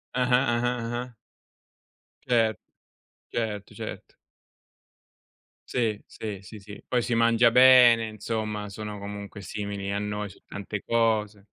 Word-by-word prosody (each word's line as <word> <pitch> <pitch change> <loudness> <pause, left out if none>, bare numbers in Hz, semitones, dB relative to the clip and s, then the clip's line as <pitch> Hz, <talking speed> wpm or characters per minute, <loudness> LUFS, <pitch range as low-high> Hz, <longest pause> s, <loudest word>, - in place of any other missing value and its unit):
Ah-ah, 125 +1 +3
ah-ah, 120 +1 0
ah-ah. 120 +1 -4 1.1
Cer 115 -4 +2 0.7
certo, 105 -3 -3
certo. - - -8 1.5
Sì, 110 -4 0
sì, 105 -3 -7
sì, 105 +3 -11
sì. 100 +1 -12
Poi 125 -1 +1
si 120 0 -1
mangia 115 +1 +5
bene, 125 -2 +7
insomma, 110 -1 -4
sono 105 0 -7
comunque 100 0 -7
simili 100 +1 -5
a 100 - -1
noi 105 0 -3
su - - -16
tante 100 0 -6
cose. 110 -3 +1
110 Hz, 120 wpm, -26 LUFS, 105-120 Hz, 1.5 s, bene